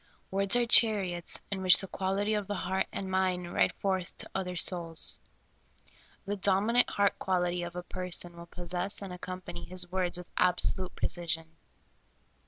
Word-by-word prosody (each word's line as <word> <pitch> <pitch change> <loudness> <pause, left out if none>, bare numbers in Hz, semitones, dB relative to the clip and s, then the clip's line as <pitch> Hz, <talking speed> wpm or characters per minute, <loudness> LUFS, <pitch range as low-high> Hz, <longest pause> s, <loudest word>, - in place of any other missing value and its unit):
Words 195 +2 +2
are 245 0 +3
chariots 195 -7 +4
in 195 -1 -3
which 185 -2 +8
the 195 - -4
quality 195 +3 -1
of 210 -2 -2
the 205 - -3
heart 190 0 -1
and 190 -1 -5
mind 185 -2 -1
ride - - +3
forth 190 -2 -2
to - - -6
other 180 -2 -3
souls. 170 -2 +1 1.1
The 205 +1 -2
dominant 205 +5 +2
heart 200 0 +1
quality 180 -1 0
of 175 0 -6
a 180 - -5
person 180 -1 -2
will 170 0 -11
possess 180 +4 -3
and 190 -2 -7
accompany 180 -1 -7
his 180 -1 -2
words 180 -1 0
with 180 0 -10
absolute 180 +1 +2
precision. 165 -2 -2
185 Hz, 160 wpm, -30 LUFS, 175-195 Hz, 1.1 s, which